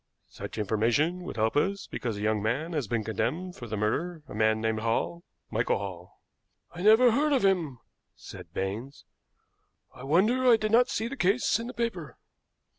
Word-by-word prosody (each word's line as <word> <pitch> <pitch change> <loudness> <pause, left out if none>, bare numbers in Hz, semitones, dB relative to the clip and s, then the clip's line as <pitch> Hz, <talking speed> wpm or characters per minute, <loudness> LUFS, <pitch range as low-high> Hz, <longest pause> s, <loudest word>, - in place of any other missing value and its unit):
"Such - - -8
information 115 - +1
would - - -6
help 110 0 0
us, 195 +6 0
because 115 -4 -4
a - - -6
young 105 0 +1
man 135 +11 -1
has 145 -8 -1
been 115 -1 -1
condemned 125 - -2
for 120 - -8
the 110 -1 -4
murder, 155 +11 -2
a - - -10
man 110 +1 +2
named 110 0 -1
Hall 115 +10 -1 0.3
Michael 115 +1 +1
Hall." 95 -3 -8 0.5
"I 175 - -7
never 220 +5 +6
heard 290 +5 +2
of 255 -7 +2
him," 170 -9 +1 0.4
said - - -11
Baines. 105 +9 -5 0.9
"I - - -13
wonder 200 - +2
I 230 - +7
did 215 -1 -2
not 245 +2 +5
see 225 - -2
the 270 - -6
case 215 +1 +2
in 230 - -5
the 250 - -7
paper." 225 -10 -3
150 Hz, 185 wpm, -28 LUFS, -, 0.9 s, I